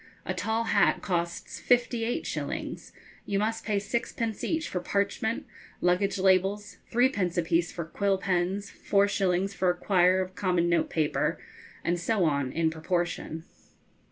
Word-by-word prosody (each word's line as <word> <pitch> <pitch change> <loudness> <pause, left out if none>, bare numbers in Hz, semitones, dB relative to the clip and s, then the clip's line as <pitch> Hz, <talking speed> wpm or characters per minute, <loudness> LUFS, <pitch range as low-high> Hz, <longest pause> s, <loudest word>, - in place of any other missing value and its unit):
a 185 - -1
tall 220 +5 -1
hat 210 -3 +2
costs 170 -3 -2
fifty 240 -1 +2
eight 235 +2 -1
shillings, - - -4 0.4
you 200 - 0
must 220 +2 -1
pay 210 -2 0
sixpence 225 +1 -2
each 325 0 -1
for 180 - -2
parchment 200 +4 -1 0.3
luggage 180 +3 +2
labels, 195 +2 +2
threepence 215 -8 +2
apiece 170 0 +1
for 170 - -5
quill 195 +4 0
pens, 190 +2 -1
four 200 0 +2
shillings 195 -1 0
for 185 -2 +1
a 175 - +1
quire 185 0 +3
of 185 0 -3
common 180 -3 +1
notepaper, 165 -2 +1 0.5
and 175 +1 0
so 200 0 +1
on 140 -4 0
in 160 +1 +1
proportion. 165 -1 -2
190 Hz, 145 wpm, -28 LUFS, 175-205 Hz, 0.5 s, quire